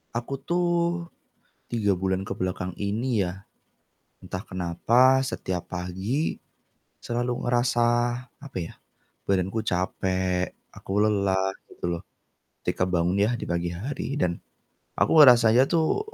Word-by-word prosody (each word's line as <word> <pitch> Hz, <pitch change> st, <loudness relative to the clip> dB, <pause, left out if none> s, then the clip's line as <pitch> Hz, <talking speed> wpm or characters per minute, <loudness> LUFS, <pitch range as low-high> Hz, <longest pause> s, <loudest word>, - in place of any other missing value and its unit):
Aku 120 Hz, +3 st, -3 dB
tuh 175 Hz, 0 st, 0 dB, 0.6 s
3 105 Hz, -4 st, +2 dB
bulan 95 Hz, 0 st, 0 dB
ke 120 Hz, -, -3 dB
belakang 90 Hz, 0 st, -3 dB
ini 105 Hz, +1 st, 0 dB
yah, 90 Hz, +2 st, -6 dB, 0.8 s
entah 90 Hz, 0 st, -5 dB
kenapa 115 Hz, +9 st, +3 dB
setiap 95 Hz, -8 st, -4 dB
pagi, 95 Hz, -, -2 dB, 0.6 s
selalu 120 Hz, +1 st, -2 dB
ngerasa 120 Hz, -1 st, +2 dB, 0.6 s
apa 140 Hz, -7 st, -8 dB
yah, 85 Hz, -2 st, -5 dB, 0.5 s
badanku 95 Hz, +2 st, 0 dB
capek, 95 Hz, 0 st, -1 dB, 0.2 s
aku -, -, -13 dB
lelah 100 Hz, -2 st, +2 dB, 0.2 s
gitu -, -, -15 dB
loh, -, -, -13 dB, 0.6 s
ketika 90 Hz, -, 0 dB
bangun 90 Hz, 0 st, +1 dB
yah 105 Hz, +4 st, +2 dB
di 120 Hz, -, -4 dB
pagi 85 Hz, 0 st, -1 dB
hari 130 Hz, +9 st, -4 dB
dan 85 Hz, -1 st, +1 dB, 0.6 s
aku -, -, +2 dB
ngerasanya 120 Hz, -1 st, +7 dB
tuh 165 Hz, -, +2 dB
100 Hz, 120 wpm, -26 LUFS, 90-125 Hz, 0.8 s, ngerasanya